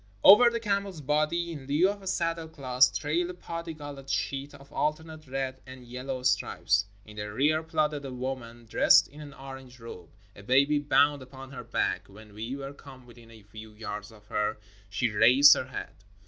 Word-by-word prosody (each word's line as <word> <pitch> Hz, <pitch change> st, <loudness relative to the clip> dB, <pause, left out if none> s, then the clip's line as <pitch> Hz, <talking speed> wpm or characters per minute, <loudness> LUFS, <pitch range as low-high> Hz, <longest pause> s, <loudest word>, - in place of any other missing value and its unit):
Over 225 Hz, +5 st, +9 dB
the 235 Hz, 0 st, -3 dB
camel's 200 Hz, -5 st, -2 dB
body, 155 Hz, +4 st, 0 dB
in 140 Hz, -5 st, -8 dB
lieu 150 Hz, +6 st, +3 dB
of 200 Hz, 0 st, -5 dB
a 190 Hz, -, -10 dB
saddle 165 Hz, -3 st, -1 dB
cloth, 130 Hz, -4 st, +2 dB
trailed 165 Hz, +4 st, -1 dB
a -, -, -5 dB
parti 170 Hz, -2 st, -6 dB
colored 145 Hz, -2 st, -9 dB
sheet 140 Hz, +1 st, -2 dB
of 140 Hz, 0 st, -16 dB
alternate 155 Hz, 0 st, -3 dB
red 130 Hz, 0 st, -4 dB
and 130 Hz, -1 st, -11 dB
yellow 125 Hz, +1 st, -6 dB
stripes. 100 Hz, -5 st, +1 dB, 0.2 s
In 105 Hz, 0 st, -14 dB
the 105 Hz, 0 st, -5 dB
rear 150 Hz, +8 st, +2 dB
plodded 155 Hz, -3 st, -1 dB
a 135 Hz, -, -6 dB
woman 125 Hz, -2 st, -6 dB
dressed 110 Hz, -, +5 dB
in 150 Hz, +2 st, -13 dB
an 145 Hz, -2 st, -10 dB
orange 135 Hz, -2 st, -11 dB
robe, 90 Hz, -7 st, -10 dB, 0.3 s
a -, -, -12 dB
baby 140 Hz, +7 st, +3 dB
bound 145 Hz, 0 st, +3 dB
upon 130 Hz, +1 st, -11 dB
her 135 Hz, -, -8 dB
back. -, -, -2 dB
When 105 Hz, +1 st, -15 dB
we 115 Hz, +5 st, -5 dB
were 140 Hz, 0 st, -7 dB
come 135 Hz, -3 st, -14 dB
within 120 Hz, -1 st, -16 dB
a 110 Hz, -2 st, -15 dB
few 110 Hz, +1 st, -12 dB
yards 105 Hz, -1 st, -7 dB
of 105 Hz, -2 st, -18 dB
her 105 Hz, -1 st, -1 dB, 0.3 s
she 110 Hz, +4 st, -1 dB
raised 130 Hz, +7 st, +7 dB
her -, -, -2 dB
head. 130 Hz, -, -6 dB
135 Hz, 190 wpm, -28 LUFS, 120-155 Hz, 0.3 s, Over